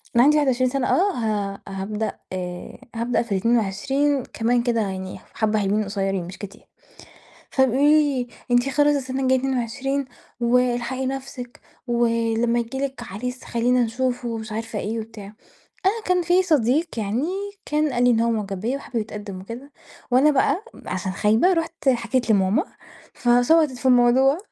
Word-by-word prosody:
أنا 235 Hz, -, +6 dB
عندي 300 Hz, +3 st, +5 dB
21 260 Hz, -3 st, +2 dB
سنة 270 Hz, -2 st, 0 dB
آه 400 Hz, +3 st, +3 dB
ه 205 Hz, -4 st, -2 dB
هابدأ 205 Hz, +2 st, -4 dB, 0.8 s
هابدأ 235 Hz, +2 st, 0 dB
في 235 Hz, -3 st, -8 dB
ال22 240 Hz, +7 st, +1 dB
كمان 235 Hz, +1 st, 0 dB
كده 235 Hz, -2 st, +1 dB
يعني 190 Hz, -2 st, -4 dB
حبّة 215 Hz, -1 st, +1 dB
حلوين 205 Hz, +2 st, +1 dB
قصيرين 195 Hz, -3 st, -2 dB
مش 185 Hz, -, -9 dB
كتير. 200 Hz, -2 st, -10 dB, 0.9 s
فبيقولوا 265 Hz, 0 st, +2 dB
لي 290 Hz, -5 st, +3 dB, 0.2 s
أنتِ 245 Hz, +2 st, +3 dB
خلاص 290 Hz, +2 st, +3 dB
السنة 265 Hz, -1 st, -3 dB
الجاية 260 Hz, 0 st, +3 dB
22، 270 Hz, +2 st, -1 dB, 0.4 s
والحقي 250 Hz, +2 st, +1 dB
نفسِك، 260 Hz, -2 st, -6 dB, 0.3 s
ولما 230 Hz, -1 st, +1 dB
ييجي 235 Hz, +3 st, -3 dB
لِك 270 Hz, -2 st, -3 dB
عريس 250 Hz, +4 st, -6 dB
خلّينا 245 Hz, +1 st, +1 dB
نشوفه 245 Hz, +1 st, -2 dB
ومش 220 Hz, -1 st, -5 dB
عارفة 225 Hz, 0 st, -4 dB
إيه 220 Hz, +3 st, -3 dB
وبتاع. 220 Hz, -2 st, -9 dB, 0.6 s
أنا 435 Hz, +3 st, +1 dB
كان 365 Hz, -1 st, +2 dB
في 355 Hz, +2 st, +3 dB
صديق 300 Hz, -2 st, +2 dB
يعني 220 Hz, +7 st, -1 dB, 0.4 s
كان 300 Hz, -1 st, 0 dB
قال 245 Hz, 0 st, +1 dB
لي 245 Hz, -, +5 dB
إن 230 Hz, -1 st, +3 dB
هو 235 Hz, -, +2 dB
معجب 200 Hz, -4 st, -3 dB
بيّا 240 Hz, +6 st, -1 dB
وحابب 275 Hz, -3 st, -8 dB
يتقدم 210 Hz, -3 st, -5 dB
وكده، 235 Hz, +9 st, -9 dB, 0.4 s
وأنا 260 Hz, +5 st, +5 dB
بقى 285 Hz, +7 st, +1 dB, 0.2 s
عشان 185 Hz, +1 st, -3 dB
خايبة 220 Hz, -, +3 dB
رُحت 330 Hz, -4 st, -2 dB
حكيت 250 Hz, -1 st, +1 dB
لماما 200 Hz, -, +3 dB, 0.5 s
فشبطت 255 Hz, +5 st, +3 dB
في 255 Hz, +1 st, -5 dB
الموضوع. 255 Hz, +4 st, +5 dB
245 Hz, 150 wpm, -23 LUFS, 220-270 Hz, 0.9 s, أنا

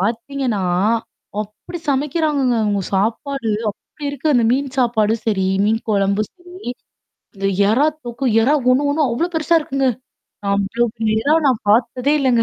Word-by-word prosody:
பார்த்தீங்கன்னா, 230 Hz, +1 st, -1 dB, 0.8 s
அப்படி 215 Hz, -, -9 dB
சமைக்கிறாங்கங்க, 280 Hz, -2 st, +1 dB
அவுங்க 205 Hz, -2 st, 0 dB
சாப்பாடு 230 Hz, +5 st, -1 dB, 0.2 s
அப்படி 290 Hz, -, -13 dB
இருக்கு. 285 Hz, +2 st, 0 dB
அந்த 235 Hz, -2 st, +4 dB
மீன் 270 Hz, 0 st, -1 dB
சாப்பாடு 225 Hz, -3 st, +2 dB
சரி, 190 Hz, -4 st, +1 dB, 0.2 s
மீன் 225 Hz, +1 st, +1 dB
குழம்பு 200 Hz, +1 st, +2 dB
சரி. 360 Hz, -3 st, -11 dB, 0.7 s
அந்த 195 Hz, 0 st, -3 dB, 0.2 s
எறா 270 Hz, +7 st, +3 dB, 0.2 s
தோக்கு 240 Hz, +3 st, -5 dB, 0.2 s
எறா 280 Hz, +6 st, +3 dB, 0.2 s
ஒண்ணு 285 Hz, +3 st, +3 dB
ஒண்ணு 305 Hz, +1 st, +1 dB
அவ்ளோ 330 Hz, +10 st, 0 dB
பெருசா 320 Hz, +1 st, +2 dB
இருக்குங்க. 275 Hz, -2 st, 0 dB, 0.7 s
அவ்ளோ 200 Hz, +4 st, 0 dB
பெரிய 220 Hz, -1 st, +1 dB
எறா 300 Hz, +2 st, +4 dB
நான் 250 Hz, -4 st, 0 dB
பார்த்ததே 245 Hz, +5 st, +2 dB
இல்லங்க. 245 Hz, -4 st, +3 dB
245 Hz, 140 wpm, -19 LUFS, 220-285 Hz, 0.8 s, அந்த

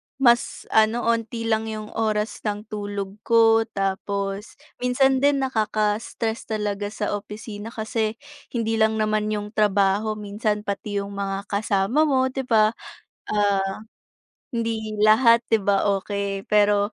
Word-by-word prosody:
mas, 240 Hz, -3 st, +2 dB
ano, 220 Hz, +2 st, +3 dB
onti 230 Hz, 0 st, -1 dB
lang 220 Hz, 0 st, 0 dB
'yong 215 Hz, -1 st, -6 dB
oras 215 Hz, -1 st, -1 dB
ng 205 Hz, 0 st, -2 dB
tulog 205 Hz, -2 st, -4 dB
ko. 225 Hz, -1 st, +5 dB
Tapos 195 Hz, 0 st, -3 dB, 0.3 s
minsan 260 Hz, +2 st, +3 dB
din 280 Hz, -1 st, +3 dB
nakaka-stress 220 Hz, -1 st, -1 dB
talaga 205 Hz, -2 st, -2 dB
sa 210 Hz, 0 st, -3 dB
opisina 210 Hz, +1 st, -6 dB
kasi, 220 Hz, -1 st, -2 dB, 0.3 s
hindi 225 Hz, -2 st, -1 dB
lang 220 Hz, 0 st, +3 dB
naman 215 Hz, 0 st, 0 dB
'yong 210 Hz, 0 st, -3 dB
trabaho, 205 Hz, 0 st, +2 dB
minsan 210 Hz, 0 st, -2 dB
pati 205 Hz, 0 st, -3 dB
'yong 200 Hz, 0 st, -3 dB
mga 195 Hz, 0 st, -3 dB
kasama 200 Hz, +5 st, +1 dB
mo, 260 Hz, -3 st, +2 dB
'di 270 Hz, -, -2 dB
ba, 215 Hz, -1 st, +4 dB, 0.6 s
ah, 200 Hz, -2 st, +1 dB, 0.7 s
hindi 225 Hz, -2 st, -2 dB
lahat, 230 Hz, +2 st, +6 dB
'di 225 Hz, -, +4 dB
ba, 200 Hz, 0 st, +2 dB
okey. 200 Hz, 0 st, -3 dB
Pero 205 Hz, 0 st, +3 dB
215 Hz, 130 wpm, -23 LUFS, 205-225 Hz, 0.7 s, lahat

